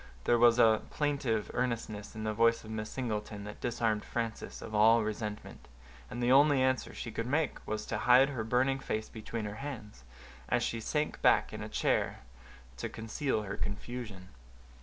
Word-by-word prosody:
There 120 - +3
was 120 0 +6
a 110 -2 +5
plaintive 135 -8 -1
earnestness 115 -4 -3
in 110 - -5
the 110 0 -1
voice 115 +1 +3
of 110 - -9
Miss 110 -1 -4
Singleton 105 -4 -4
that 105 +1 -9
disarmed 110 -2 0
Frances 115 -1 -4
of 110 - -8
all 110 +2 +5
resentment, 105 0 -5 0.4
and 120 - -4
the 120 - +3
only 140 +1 +6
answer 130 0 +1
she 115 - -6
could 115 +2 -3
make 145 +2 0
was 110 0 -3
to 105 - -3
hide 125 +4 +6
her 125 -6 -3
burning 130 +4 +1
face 110 -5 -3
between 110 0 -5
her 105 +1 -5
hands, 110 - -7 0.5
as - - +2
she 115 - -1
sank 150 +7 -2
back - - +4
in - - -6
a - - -6
chair - - 0 0.6
to - - -4
conceal 110 +1 -2
her 100 0 -4
confusion. 105 -2 -5
115 Hz, 180 wpm, -31 LUFS, 110-125 Hz, 0.6 s, was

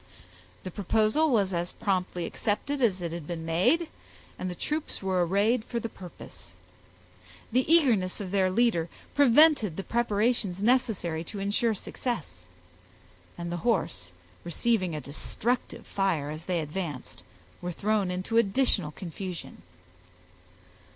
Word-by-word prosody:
The 185 - -5
proposal 215 - +2
was 200 -7 +2
as 175 0 -2
promptly 180 -3 -1
accepted 270 +11 -2
as 190 -7 +2
it 170 - -2
had 170 -3 -6
been 165 -2 -4
made, 245 - +2 0.5
and 185 - -2
the 180 - -5
troops 300 - -3
were 185 -2 +2
arrayed 205 +7 +2
for 235 0 -3
the 230 - -4
purpose. 170 - -12 1.0
The 255 +6 +2
eagerness 235 - +4
of 190 -3 -5
their 190 -2 +3
leader 185 -5 +2 0.2
prevented 280 - +5
the 195 - -3
preparations 220 -4 +1
necessary 210 -8 +1
to 205 - -7
insure 205 +3 +1
success, 120 - -5 0.9
and 170 0 -4
the 175 - -2
horse, 165 - -1 0.3
receiving 185 0 0
a 150 - -4
destructive 220 - -3
fire 170 -7 0
as 155 +2 -7
they 180 -3 0
advanced, 150 -3 -5 0.4
were 180 0 -3
thrown 205 +1 0
into 185 +5 -1
additional 215 - +2
confusion. 180 - -7
195 Hz, 130 wpm, -28 LUFS, 170-235 Hz, 1.0 s, prevented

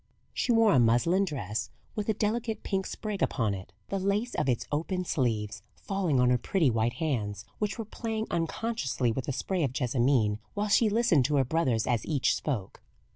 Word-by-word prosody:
She - - 0
wore 225 -2 +5
a 130 - +5
muslin 120 +12 +3
dress 115 - -3 0.2
with 210 0 -3
a 215 - +2
delicate 220 +2 -1
pink 190 -2 -1
sprig 210 -3 -4
upon 110 -6 +1
it, 95 -2 -8 0.2
the 195 - -1
lace 200 +5 0
of 130 - 0
its 120 - 0
open 180 +5 -1
sleeves 110 - -1
falling 185 -9 0
on 125 0 +4
her 125 - +3
pretty 160 -4 +2
white 115 +1 +1
hands, 105 - -2
which 210 -1 -1
were 225 - -4
playing 220 0 -3
unconsciously 165 - -1
with 125 +3 -4
a - - 0
spray 180 +6 -1
of 130 -3 -1
jessamine, 120 -4 +2 0.2
while 205 +1 -1
she 220 +1 +4
listened 205 - +3
to 150 - +1
her 135 -2 +3
brothers 130 -6 +1
as 120 -3 0
each 145 -5 +2
spoke. 115 -11 -3
150 Hz, 190 wpm, -29 LUFS, 120-200 Hz, 0.2 s, wore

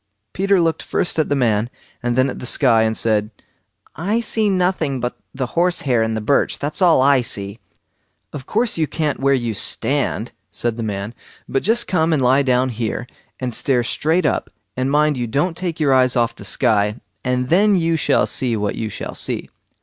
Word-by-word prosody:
Peter 195 0 +2
looked 165 -2 +1
first 175 - -1
at 155 - +1
the 145 - +2
man, 115 -3 +1 0.3
and 120 0 -1
then 130 +1 +3
at 130 - -5
the - - -6
sky, 120 -5 +4
and 110 0 0
said: 105 -2 +1 0.7
"I 200 +9 0
see 220 -2 0
nothing 180 -7 0
but 125 0 -3 0.2
the 130 -1 -3
horse 175 +1 +1
hair 125 -5 +1
in 110 0 0
the 110 - -2
birch; 140 +7 +1
that's 145 +6 -3
all 170 -7 +5
I 140 -1 +5
see!" 100 -2 -3 0.7
"Of 135 -3 -8
course 225 -4 0
you 155 - +1
can't 150 -2 -2
where 140 +1 +3
you 120 -3 -2
stand", 100 - 0 0.2
said 120 -1 -2
the 115 - -5
man; 105 0 -4 0.3
"but 135 - -1
just 235 +3 +1
come 160 -3 +1
and 150 - +2
lie 130 +2 +4
down 130 -1 +2
here, 115 -1 -3 0.3
and 125 -2 -3
stare 125 +1 +1
straight 160 +7 0
up, 150 - 0 0.3
and 130 +1 -1
mind 150 0 +2
you 120 -1 -2
don't 150 +9 0
take 175 -2 -4
your 145 -3 +3
eyes 130 -1 +3
off 120 -2 +1
the - - -11
sky; 105 -3 +1 0.2
and 125 0 -1
then 200 +5 +4
you 165 -2 +1
shall 160 - +2
see 120 -4 -1
what 105 -1 -1
you 110 - -4
shall - - -6
see." - - -4
135 Hz, 205 wpm, -20 LUFS, 120-165 Hz, 0.7 s, all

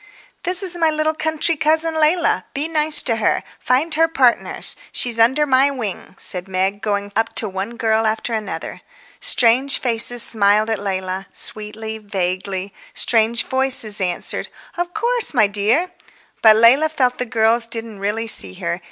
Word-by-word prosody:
"This 365 +2 +1
is 360 -2 -1
my 325 -2 +2
little 310 0 -1
country 315 +1 -1
cousin 320 +2 +1
Leila. 320 +2 +1
Be 290 +3 -2
nice 310 -1 +6
to 230 -3 0
her. 220 - 0 0.2
Find 285 +6 0
her 325 +1 +2
partners; 260 -7 +1 0.2
she's 235 -2 -1
under 260 +7 +3
my 270 0 +3
wing," 225 -9 -6
said 180 0 -1
Meg, 190 +2 -2
going 205 -1 -3
up 225 +1 -1
to 220 - 0
one 195 +4 -6
girl 220 -1 0
after 220 +2 -3
another. 205 -7 -6 0.4
Strange 265 - +2
faces 240 0 +1
smiled 215 0 +2
at 220 - -1
Leila—sweetly, 205 +3 -5
vaguely. 190 -1 -4 0.2
Strange 230 0 +1
voices 260 -6 +4
answered, 180 -2 -3 0.3
"Of 350 0 -4
course, 470 - 0
my 215 -4 +4
dear." 215 - 0 0.5
But 220 -1 +7
Leila 250 +8 +5
felt 255 -5 -1
the 250 - -1
girls 230 0 +1
didn't 225 -3 -6
really 210 +3 -3
see 95 - -1
her. 85 - -4
230 Hz, 155 wpm, -18 LUFS, 205-300 Hz, 0.5 s, But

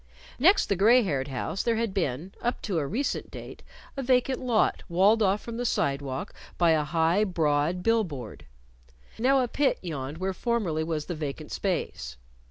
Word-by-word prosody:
Next 370 +9 +5
the 200 - +1
gray 230 +6 +5
haired 140 -8 -1
house 140 +7 -3
there 235 -1 +1
had 225 -3 -1
been 170 -1 -2
up 240 - -2
to 190 -7 -1
a 145 - -2
recent 260 - -2
date - - -10 0.3
a 275 - -3
vacant 255 0 +2
lot 240 -4 +1
walled 195 +6 +4
off 200 0 +2
from 230 -1 -7
the 245 - -2
sidewalk 140 - -1 0.2
by 170 -2 +4
a 155 -1 +3
high, 165 +6 +2
broad 165 -2 0
bill 225 0 +3
board. 130 - -8 0.7
Now 265 +3 +4
a - - -1
pit 280 +4 +1
yawned 145 -4 -5
where 190 +2 -2
formerly 190 -8 -1
was 160 -2 -3
the 175 - -4
vacant 150 -1 -5
space. 65 - -3
185 Hz, 175 wpm, -27 LUFS, 150-230 Hz, 0.7 s, Next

